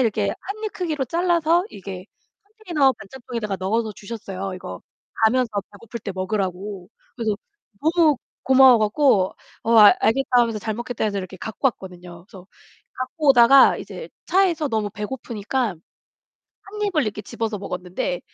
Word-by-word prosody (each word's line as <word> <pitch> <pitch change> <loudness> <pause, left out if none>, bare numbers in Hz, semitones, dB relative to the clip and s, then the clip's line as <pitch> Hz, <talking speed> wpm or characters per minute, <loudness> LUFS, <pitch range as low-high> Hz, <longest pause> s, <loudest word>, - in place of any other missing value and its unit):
이렇게 215 -4 +1
1 430 +3 -7
입 430 - -3
크기로 310 -7 -2
잘라서 340 +1 +2
이게 190 -1 -8 0.4
컨테이너 355 - +1
반찬통에다가 230 -3 -6
넣어서 215 +3 -1
주셨어요, 195 -3 -6
이거 90 - -8 0.4
가면서 250 +2 +3 0.2
배고플 230 +3 -9
때 200 - -5
먹으라고. 190 -1 -3 0.3
그래서 220 -4 -1 0.5
너무 320 -2 +3 0.3
고마워 260 -2 +7
갖고 215 -3 +2 0.3
"어, 230 - +1
아 210 -1 +10
알겠다." 270 +5 +1
하면서 230 -2 0
"잘 220 +2 -3
먹겠다." 240 0 -4
해서 200 -2 -1
이렇게 190 0 -7
갖고 220 +8 -2
왔거든요. 180 -4 -11
그래서 190 -4 -14 0.5
갖고 285 +4 -3
오다가 260 +2 +7
이제 485 - -8 0.2
차에서 350 -6 +2
너무 220 -3 -1
배고프니까 225 0 -3 0.9
1 420 +2 -7
입을 355 -8 +1
이렇게 210 -1 -3
집어서 220 -2 -4
먹었는데 180 -2 -4
225 Hz, 350 characters per minute, -22 LUFS, 200-275 Hz, 0.9 s, 아